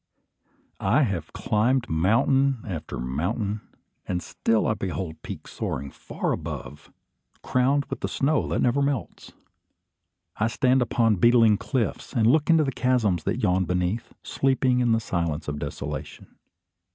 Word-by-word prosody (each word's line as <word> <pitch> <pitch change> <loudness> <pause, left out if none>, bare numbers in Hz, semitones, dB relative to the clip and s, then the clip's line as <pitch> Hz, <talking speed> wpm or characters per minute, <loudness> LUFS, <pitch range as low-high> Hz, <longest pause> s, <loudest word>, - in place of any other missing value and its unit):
I 120 +10 +3
have 95 - -2
climbed 120 +4 +1
mountain 120 - +2
after 80 -6 -5
mountain, 95 - -2 0.5
and 90 -1 -2
still 115 -1 0
I - - +2
behold 90 -5 -5
peaks - - -8
soaring 70 +1 -4
far - - -4
above, 75 +1 -6 0.5
crowned 135 +3 +2
with - - -6
the - - -2
snow 145 +2 0
that - - 0
never 125 +3 +2
melts. 140 -4 -3 1.0
I 110 - +2
stand 130 +2 +2
upon 115 -3 +2
beetling 115 0 +5
cliffs, 120 -1 -2
and 115 -5 +2
look 145 +7 +3
into 160 -2 +5
chasms 115 -10 +1
that - - -1
yawn 90 +1 +2
beneath, 90 +5 -1
sleeping 130 -2 +1
in 120 -2 +2
the 115 - +3
silence 85 -8 -2
of 75 0 -3
desolation. - - -6
115 Hz, 140 wpm, -25 LUFS, 90-130 Hz, 1.0 s, beetling